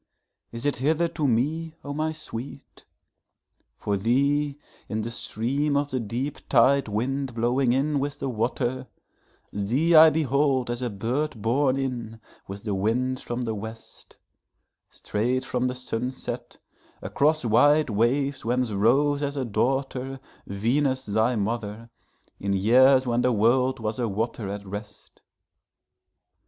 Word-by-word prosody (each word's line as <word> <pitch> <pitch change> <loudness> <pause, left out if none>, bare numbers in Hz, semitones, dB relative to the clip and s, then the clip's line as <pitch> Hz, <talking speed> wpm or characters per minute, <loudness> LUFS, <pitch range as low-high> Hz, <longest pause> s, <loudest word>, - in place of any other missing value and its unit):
is 115 +2 -7
it 145 - +1
hither 155 +6 +1
to 160 -3 -2
me, 155 +7 0
O 145 - -5
my 155 +2 -1
sweet? 135 -4 -9 0.9
For 100 -1 -1
thee, 140 +7 +1 0.3
in 110 0 -2
the 115 - -4
stream 130 +5 -1
of 145 0 -1
the 130 - -1
deep 120 +6 -4
tidewind 130 0 +2
blowing 120 +2 +2
in 140 +3 +1
with 145 +1 -3
the 135 - -3
water, 125 +2 -2 0.7
Thee 125 +12 +1
I 160 0 +9
behold 140 -4 +1
as 120 +1 -4
a 125 - -1
bird 120 +6 -2
borne 130 +5 +1
in 120 -4 -4 0.3
with 100 +1 -8
the 105 -3 -2
wind 125 +6 0
from 120 +1 -4
the 115 -2 -2
west, 110 +2 -10 0.7
Straight 125 +5 -2
from 125 0 -1
the 125 - -3
sunset, 125 0 -5 0.5
across 155 -1 +1
white 145 +5 +4
waves 135 +6 +1
whence 125 0 0
rose 135 +8 +2
as 145 0 -2
a 135 - -1
daughterVenus 130 +1 -2
thy 110 +3 +2
mother, 110 +1 -3 0.5
in 100 0 -1
years 130 +7 +5
when 120 0 +1
the 125 - +2
world 125 +4 +2
was 110 +1 -3
a 120 - 0
water 110 0 -3
at 100 0 -6
rest. 105 +2 -9
125 Hz, 135 wpm, -25 LUFS, 115-140 Hz, 0.9 s, I